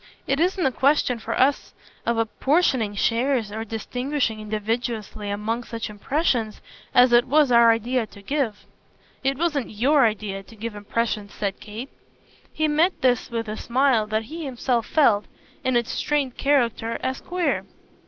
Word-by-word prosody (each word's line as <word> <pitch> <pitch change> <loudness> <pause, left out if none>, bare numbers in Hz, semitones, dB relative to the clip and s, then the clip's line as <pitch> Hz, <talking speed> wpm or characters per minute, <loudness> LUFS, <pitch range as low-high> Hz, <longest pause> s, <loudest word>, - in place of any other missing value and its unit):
It 275 +1 0
isn't 360 +1 +1
a 265 - +3
question 260 -2 +2
for 230 +1 -3
us 275 +2 +1 0.3
of 235 0 +1
apportioning 230 - +1
shares 230 +1 +1
or 220 +1 -4
distinguishing 245 +2 -2
invidiously 215 0 -3
among 215 +4 -2
such 230 -2 -5
impressions 230 - -1 0.3
as 245 0 +5
it 240 +1 +6
was 290 0 +4
our 235 -1 +7
idea 230 +1 0
to 200 - -15
give." 250 -4 -2 0.6
"It 270 0 +1
wasn't 300 -5 0
YOUR 260 +4 +3
idea 205 -2 -4
to 210 +3 -16
give 225 +1 -5
impressions," 210 0 -2
said 200 -1 -3
Kate. 220 +6 -8 0.6
He 310 0 0
met 315 +5 +2
this 245 -1 +2
with 230 -1 -3
a 215 - -4
smile 245 -3 +2
that 215 +1 -1
he 320 +8 -7
himself 245 -3 -1
felt, 225 -10 +3 0.4
in 260 -1 +1
its 235 -1 +1
strained 285 -4 -1
character, 235 -5 +1
as 260 0 -2
queer. 355 -1 -1
235 Hz, 155 wpm, -24 LUFS, 220-275 Hz, 0.6 s, our